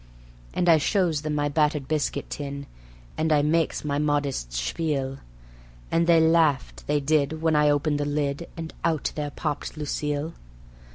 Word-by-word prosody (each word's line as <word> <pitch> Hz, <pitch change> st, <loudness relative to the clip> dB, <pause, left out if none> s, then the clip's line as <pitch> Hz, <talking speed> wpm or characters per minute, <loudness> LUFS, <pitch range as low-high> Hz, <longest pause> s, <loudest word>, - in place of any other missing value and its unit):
And 175 Hz, -, +1 dB
I 165 Hz, -2 st, +7 dB
shows 170 Hz, -2 st, +1 dB
them 150 Hz, -1 st, -2 dB
my 145 Hz, 0 st, +1 dB
battered 150 Hz, -2 st, +1 dB
biscuit 155 Hz, -2 st, -1 dB
tin, 140 Hz, -1 st, -5 dB, 0.5 s
and 160 Hz, 0 st, +1 dB
I 145 Hz, -1 st, +4 dB
makes 160 Hz, 0 st, +1 dB
my 145 Hz, -1 st, 0 dB
modest 145 Hz, -, 0 dB
spiel, 135 Hz, -, -2 dB, 0.7 s
And 165 Hz, 0 st, +2 dB
they 170 Hz, -1 st, +6 dB
laughed, 160 Hz, -4 st, +2 dB
they 150 Hz, 0 st, +2 dB
did, 155 Hz, +2 st, +1 dB
when 160 Hz, -1 st, +3 dB
I 150 Hz, 0 st, +4 dB
opened 145 Hz, 0 st, +1 dB
the 145 Hz, -, 0 dB
lid, 145 Hz, +2 st, -1 dB
and 160 Hz, -1 st, -6 dB
out 160 Hz, -3 st, 0 dB
there 150 Hz, -1 st, -3 dB
popped 145 Hz, +2 st, -4 dB
Lucille. 150 Hz, +1 st, -2 dB
150 Hz, 160 wpm, -25 LUFS, 145-160 Hz, 0.7 s, I